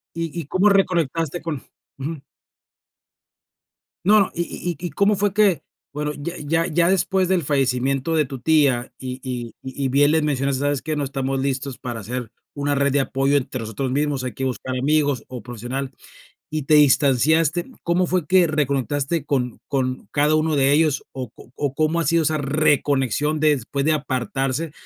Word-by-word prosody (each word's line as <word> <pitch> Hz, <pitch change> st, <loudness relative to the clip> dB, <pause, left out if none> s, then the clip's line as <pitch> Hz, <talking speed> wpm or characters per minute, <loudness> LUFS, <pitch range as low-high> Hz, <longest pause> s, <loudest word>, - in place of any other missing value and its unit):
y 165 Hz, -1 st, -3 dB
y, -, -, -13 dB
¿cómo 185 Hz, +7 st, +3 dB
reconectaste 170 Hz, -4 st, +1 dB
con 160 Hz, -5 st, -4 dB, 0.4 s
ujú. 145 Hz, +1 st, -5 dB, 1.8 s
No, 210 Hz, +3 st, +6 dB
no 195 Hz, -, +2 dB
y 170 Hz, -, -1 dB
y 175 Hz, -, -4 dB
y 175 Hz, -, -5 dB
y -, -, -4 dB
cómo 205 Hz, +1 st, +2 dB
fue 200 Hz, 0 st, +1 dB
que 200 Hz, -6 st, +3 dB, 0.3 s
bueno, 150 Hz, 0 st, -2 dB
ya 170 Hz, +4 st, -5 dB
ya, 165 Hz, +3 st, 0 dB
ya 170 Hz, +2 st, +2 dB
después 190 Hz, 0 st, +2 dB
del 185 Hz, -3 st, +2 dB
fallecimiento 135 Hz, +2 st, 0 dB
de 155 Hz, -, +3 dB
tu 135 Hz, -1 st, -7 dB
tía 140 Hz, -6 st, +2 dB
y 130 Hz, 0 st, -6 dB
y 120 Hz, -3 st, -5 dB
y 135 Hz, +1 st, -3 dB
bien 145 Hz, +3 st, +4 dB
les 160 Hz, 0 st, +2 dB
mencionas: 140 Hz, -2 st, 0 dB
"¿Sabes 145 Hz, 0 st, -1 dB
qué? 155 Hz, -1 st, -2 dB
No 145 Hz, -, -1 dB
estamos 135 Hz, 0 st, -2 dB
listos 135 Hz, -1 st, -2 dB
para 120 Hz, -3 st, -5 dB
ser 120 Hz, +2 st, -5 dB, 0.2 s
una 145 Hz, 0 st, -1 dB
red 140 Hz, -1 st, +1 dB
de 145 Hz, -, +3 dB
apoyo 135 Hz, +1 st, +1 dB
entre 130 Hz, -1 st, -5 dB
nosotros 115 Hz, +4 st, -3 dB
mismos, 145 Hz, -2 st, 0 dB
hay 125 Hz, -, -3 dB
que 135 Hz, -, -3 dB
buscar 130 Hz, 0 st, -3 dB
amigos 145 Hz, -1 st, +1 dB
o 125 Hz, -4 st, -7 dB
profesional". 125 Hz, +3 st, -5 dB, 0.6 s
Y 155 Hz, -1 st, -2 dB
te 150 Hz, +3 st, +4 dB
distanciaste, 150 Hz, +3 st, +4 dB, 0.2 s
¿cómo 175 Hz, +1 st, +2 dB
fue 180 Hz, -2 st, 0 dB
que 185 Hz, 0 st, +5 dB
reconectaste 145 Hz, 0 st, -1 dB
con 125 Hz, -4 st, -1 dB
con 130 Hz, -2 st, -2 dB
cada 150 Hz, +1 st, +3 dB
uno 155 Hz, 0 st, +1 dB
de 135 Hz, 0 st, +3 dB
ellos? 150 Hz, -1 st, +2 dB
O 130 Hz, -4 st, -6 dB
o -, -, -16 dB
o, 140 Hz, -2 st, -2 dB
¿cómo 155 Hz, +3 st, +1 dB
ha 165 Hz, -, 0 dB
sido 165 Hz, +3 st, +3 dB
esa 155 Hz, +1 st, +1 dB
reconexión 145 Hz, 0 st, +1 dB
después 140 Hz, -2 st, +1 dB
de 155 Hz, -, +3 dB
apartarse? 135 Hz, +2 st, -2 dB
145 Hz, 180 wpm, -22 LUFS, 130-160 Hz, 1.8 s, No